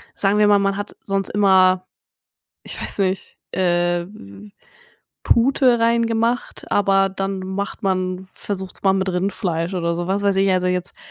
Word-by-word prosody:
sagen 200 Hz, +1 st, +2 dB
wir 210 Hz, -, +5 dB
mal, 205 Hz, -1 st, +5 dB
man 195 Hz, 0 st, 0 dB
hat 205 Hz, 0 st, -6 dB
sonst 195 Hz, -1 st, -2 dB
immer, 185 Hz, -2 st, +3 dB, 0.8 s
ich -, -, -8 dB
weiß -, -, -2 dB
nicht, 190 Hz, -1 st, -2 dB
äh, 175 Hz, -1 st, +1 dB
v 195 Hz, -, -15 dB
v 100 Hz, -, -13 dB, 0.7 s
Pute 245 Hz, 0 st, +3 dB
reingemacht, 230 Hz, +1 st, 0 dB
aber 195 Hz, -1 st, +3 dB
dann 195 Hz, 0 st, -3 dB
macht 190 Hz, +4 st, -5 dB
man 185 Hz, -1 st, -1 dB
versucht's 190 Hz, -1 st, -6 dB
mal 195 Hz, -1 st, +4 dB
mit 190 Hz, 0 st, 0 dB
Rindfleisch 180 Hz, -1 st, -2 dB
oder 170 Hz, -2 st, -1 dB
so, 175 Hz, 0 st, -3 dB
was 195 Hz, +2 st, 0 dB
weiß 200 Hz, -1 st, +2 dB
ich. 195 Hz, 0 st, +3 dB
Also, 180 Hz, -1 st, +1 dB
jetzt 180 Hz, -1 st, -2 dB
195 Hz, 160 wpm, -20 LUFS, 185-200 Hz, 0.8 s, wir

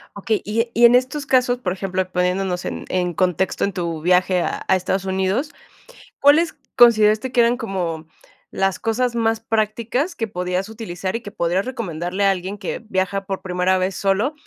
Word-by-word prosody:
Okey, 205 Hz, +2 st, -1 dB
y 210 Hz, +2 st, -2 dB
e 235 Hz, 0 st, -5 dB
y 235 Hz, -, +6 dB
en 235 Hz, -, +7 dB
estos 260 Hz, +4 st, +1 dB
casos, 250 Hz, -1 st, +2 dB
por 190 Hz, -7 st, -2 dB
ejemplo, 190 Hz, -1 st, -2 dB
poniéndonos 180 Hz, 0 st, -1 dB
en -, -, -5 dB
en 180 Hz, -1 st, -1 dB
contexto 185 Hz, +1 st, 0 dB
en 200 Hz, -, 0 dB
tu 170 Hz, -3 st, -3 dB
viaje 180 Hz, +1 st, +3 dB
a -, -, -3 dB
a 190 Hz, -, +4 dB
Estados 190 Hz, +1 st, -1 dB
Unidos, 190 Hz, +9 st, -1 dB, 0.7 s
¿cuáles 300 Hz, +4 st, +4 dB, 0.2 s
consideraste 225 Hz, 0 st, +5 dB
que 245 Hz, -, +5 dB
eran 235 Hz, +1 st, +3 dB
como 175 Hz, -9 st, -4 dB, 0.4 s
las 195 Hz, -1 st, -1 dB
cosas 235 Hz, +2 st, 0 dB
más 225 Hz, -1 st, 0 dB
prácticas 225 Hz, -, -1 dB
que 225 Hz, -, -2 dB
podías 180 Hz, +1 st, -2 dB
utilizar 195 Hz, -4 st, -5 dB
y -, -, -10 dB
que 205 Hz, -, -9 dB
podrías 175 Hz, +3 st, 0 dB
recomendarle 190 Hz, -7 st, -3 dB
a 195 Hz, -, +5 dB
alguien 190 Hz, +2 st, -4 dB
que 205 Hz, -, -4 dB
viaja 195 Hz, -2 st, -2 dB
por 195 Hz, -1 st, -4 dB
primera 180 Hz, 0 st, +1 dB
vez 185 Hz, 0 st, -1 dB
solo? 200 Hz, +9 st, +1 dB
195 Hz, 185 wpm, -21 LUFS, 185-230 Hz, 0.7 s, en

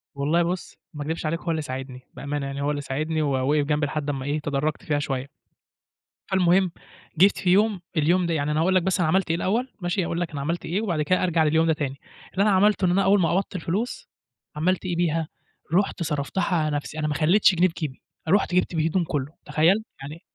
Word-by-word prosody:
والله 150 Hz, +5 st, +2 dB
بُصّ، 180 Hz, +1 st, -4 dB, 0.2 s
ما 150 Hz, -, -7 dB
اكدبش 160 Hz, +2 st, -4 dB
عليك 160 Hz, +2 st, -1 dB
هو 170 Hz, -, -3 dB
اللي 160 Hz, -1 st, -1 dB
ساعدني، 130 Hz, -2 st, -6 dB
بأمانة 140 Hz, 0 st, -4 dB
يعني 140 Hz, 0 st, -4 dB
هو 145 Hz, +1 st, 0 dB
اللي 145 Hz, -, -3 dB
ساعدني 155 Hz, +3 st, -2 dB
ووقف 140 Hz, +1 st, +1 dB
جنبي 150 Hz, 0 st, +1 dB
لحد 150 Hz, 0 st, -3 dB
لمّا 135 Hz, -2 st, -3 dB
إيه، 145 Hz, +2 st, -1 dB
تدرجت 150 Hz, +1 st, -2 dB
فيها 145 Hz, -1 st, 0 dB
شوية. 135 Hz, -2 st, -3 dB, 1.0 s
فالمهم 185 Hz, -1 st, +3 dB, 0.5 s
جيت 195 Hz, +5 st, +5 dB
في 180 Hz, -, -1 dB
يوم 200 Hz, 0 st, +3 dB, 0.2 s
اليوم 175 Hz, +4 st, +3 dB
ده 170 Hz, -, 0 dB
يعني 150 Hz, -1 st, 0 dB
أنا 150 Hz, -, +1 dB
أقول 185 Hz, +3 st, +2 dB
لك 185 Hz, -, +3 dB
بس 190 Hz, +1 st, 0 dB
أنا 175 Hz, -, +2 dB
عملت 190 Hz, +3 st, +1 dB
إيه 165 Hz, -, +2 dB
الأول، 225 Hz, +9 st, 0 dB
ماشي؟ 175 Hz, +1 st, 0 dB
أقول 170 Hz, +1 st, -2 dB
لك 175 Hz, -, -3 dB
أنا 145 Hz, -2 st, -4 dB
عملت 165 Hz, +5 st, -2 dB
إيه 185 Hz, +6 st, -1 dB
وبعد 175 Hz, -8 st, -1 dB
كده 185 Hz, +5 st, +1 dB
أرجع 170 Hz, -3 st, +2 dB
لليوم 160 Hz, +2 st, +3 dB
ده 160 Hz, -, +4 dB
تاني. 140 Hz, -3 st, -4 dB, 0.3 s
اللي 195 Hz, -, +2 dB
أنا 210 Hz, -, +3 dB
عملته 200 Hz, +1 st, +3 dB
إن 175 Hz, -, +3 dB
أنا 195 Hz, +2 st, +3 dB
أول 200 Hz, +1 st, +4 dB
ما 165 Hz, -, +2 dB
قبضت 195 Hz, +2 st, -1 dB
الفلوس، 215 Hz, -, -3 dB, 0.5 s
عملت 180 Hz, +5 st, 0 dB
إيه 180 Hz, -2 st, -1 dB
بيها، 165 Hz, -2 st, 0 dB, 0.5 s
رُحت 190 Hz, -1 st, +1 dB
صرفتها 150 Hz, +5 st, -2 dB
على 155 Hz, -2 st, 0 dB
نفسي، 150 Hz, +1 st, -4 dB
أنا 150 Hz, -, 0 dB
ما 150 Hz, -, -1 dB
خليتش 180 Hz, +6 st, +4 dB
جنيه 175 Hz, +2 st, +4 dB
في 170 Hz, -, -7 dB
جيبي. 150 Hz, -5 st, -5 dB, 0.3 s
رُحت 195 Hz, -1 st, +2 dB
جِبت 180 Hz, -1 st, +1 dB
بيه 160 Hz, 0 st, +1 dB
هدوم 180 Hz, +2 st, +1 dB
كله، 145 Hz, -3 st, -3 dB
تخيل! 175 Hz, +8 st, +3 dB, 0.2 s
يعني 150 Hz, +5 st, -8 dB
165 Hz, 225 wpm, -24 LUFS, 150-185 Hz, 1.0 s, جيت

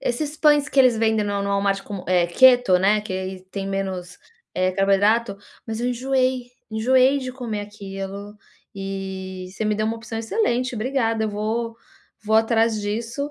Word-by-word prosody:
esses 295 Hz, +5 st, -2 dB
pães 295 Hz, -2 st, +4 dB
que 280 Hz, -, -2 dB
eles 250 Hz, -3 st, +5 dB
vendem 220 Hz, -1 st, +1 dB
no 200 Hz, -1 st, -1 dB
no 200 Hz, -, -2 dB
Walmart 200 Hz, 0 st, 0 dB
com, 200 Hz, -3 st, -7 dB
eh, 180 Hz, -2 st, +3 dB
keto, 245 Hz, 0 st, +5 dB
né, 205 Hz, +3 st, +3 dB
que 210 Hz, -3 st, -6 dB
aí 190 Hz, 0 st, -4 dB
tem 195 Hz, 0 st, -4 dB
menos, 190 Hz, -2 st, -4 dB, 0.4 s
eh, 185 Hz, 0 st, +1 dB
carboidrato, 200 Hz, +3 st, +2 dB, 0.3 s
mas 225 Hz, 0 st, -4 dB
eu 245 Hz, -, 0 dB
enjoei, 255 Hz, 0 st, 0 dB, 0.2 s
enjoei 255 Hz, +5 st, +3 dB
de 255 Hz, -2 st, -5 dB
comer 235 Hz, -5 st, -4 dB
aquilo 200 Hz, 0 st, -7 dB, 0.4 s
e 190 Hz, -1 st, -6 dB
você 220 Hz, -, -3 dB
me 210 Hz, 0 st, +1 dB
deu 215 Hz, +1 st, -1 dB
uma 225 Hz, +1 st, -1 dB
opção 225 Hz, 0 st, -6 dB
excelente, 250 Hz, -, 0 dB
obrigada. 225 Hz, -2 st, 0 dB
Eu -, -, -1 dB
vou 225 Hz, +2 st, -2 dB, 0.5 s
vou 220 Hz, +1 st, +3 dB
atrás 225 Hz, -1 st, +2 dB
disso, 230 Hz, +7 st, -3 dB
220 Hz, 170 wpm, -22 LUFS, 195-245 Hz, 0.5 s, eles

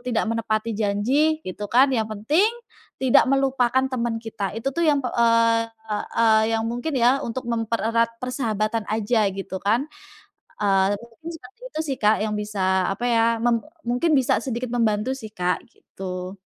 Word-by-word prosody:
tidak -, -, +2 dB
menepati 225 Hz, 0 st, -1 dB
janji 210 Hz, +6 st, +1 dB, 0.2 s
gitu 185 Hz, +3 st, -5 dB
kan, 260 Hz, +4 st, +6 dB
yang 225 Hz, -4 st, 0 dB
penting 255 Hz, -, +2 dB, 0.5 s
tidak 260 Hz, -2 st, +5 dB
melupakan 260 Hz, -2 st, +2 dB
teman 235 Hz, -2 st, -1 dB
kita. 210 Hz, -4 st, -4 dB
Itu 225 Hz, +4 st, -2 dB
tuh 340 Hz, -, +1 dB
yang 290 Hz, -2 st, +4 dB
p -, -, -1 dB
eee, 230 Hz, -1 st, +2 dB
yang 225 Hz, -, -1 dB
mungkin 245 Hz, +7 st, -3 dB
ya 250 Hz, +2 st, +4 dB
untuk 240 Hz, +2 st, -4 dB
mempererat 230 Hz, 0 st, 0 dB
persahabatan 230 Hz, -4 st, -1 dB
aja 220 Hz, +1 st, +1 dB
gitu 190 Hz, -1 st, -5 dB
kan, 225 Hz, +9 st, 0 dB, 0.7 s
eee, 195 Hz, -1 st, +3 dB
kurang 235 Hz, -1 st, -16 dB
lebih 335 Hz, -, -4 dB
seperti 260 Hz, -, -17 dB
itu -, -, -3 dB
sih, 270 Hz, -, -2 dB
Kak, 215 Hz, +1 st, +4 dB
yang 215 Hz, -, -1 dB
bisa, 190 Hz, -3 st, 0 dB
apa 235 Hz, +5 st, -4 dB
ya 230 Hz, -2 st, +3 dB, 0.2 s
mem 235 Hz, -1 st, +1 dB, 0.2 s
mungkin 250 Hz, +7 st, +1 dB
bisa 265 Hz, +1 st, +2 dB
sedikit 250 Hz, -1 st, -3 dB
membantu 225 Hz, +1 st, +1 dB
sih, 220 Hz, -5 st, -9 dB
Kak, 180 Hz, -2 st, -1 dB
gitu. 185 Hz, 0 st, -7 dB
230 Hz, 160 wpm, -23 LUFS, 210-250 Hz, 0.7 s, kan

